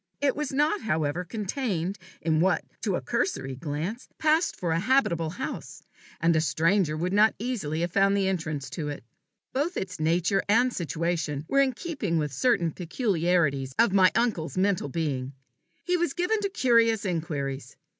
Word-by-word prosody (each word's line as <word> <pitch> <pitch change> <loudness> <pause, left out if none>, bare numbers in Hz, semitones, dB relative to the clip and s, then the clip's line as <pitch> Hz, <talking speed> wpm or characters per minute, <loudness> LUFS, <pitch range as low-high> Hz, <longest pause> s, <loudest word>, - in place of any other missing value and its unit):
It 285 -1 +1
was 300 -2 -3
not, 300 +8 +1
however, 160 -3 -1
contained 200 - -3 0.2
in 160 -1 +2
what, 185 +3 +2 0.2
to - - 0
a - - -2
cursory 135 - -1
glance, 160 - -4
passed 315 +2 +2
for 170 -3 -1
the 165 - +1
habitable 180 -8 +2
house, 240 +11 -6 0.4
and 165 0 +3
a 160 - +3
stranger 165 0 +2
would 180 +4 -1
not 215 +2 +5
easily 195 -10 -2
have 175 0 -1
found 195 +1 +3
the 195 -1 +1
entrance 155 -7 -3
to 150 -4 -4
it. 145 - -6 0.5
Both 300 +7 -1
its 185 -3 -4
nature 170 +4 +2
and 240 +4 +4
situation 165 -2 -2
were 275 +6 +3
in 265 -2 +2
keeping 245 - -2
with 150 -3 -1
certain 175 - +2
peculiarities 170 - 0
of 215 -5 +4
my 190 -2 +6
uncle's 215 -9 0
mental 185 -5 +1
being. 135 -4 -2 0.5
He 360 0 +1
was 345 -5 0
given 360 +5 +1
to 400 -1 -1
curious 230 - +3
inquiries. 145 -7 -3
180 Hz, 165 wpm, -27 LUFS, 160-240 Hz, 0.5 s, my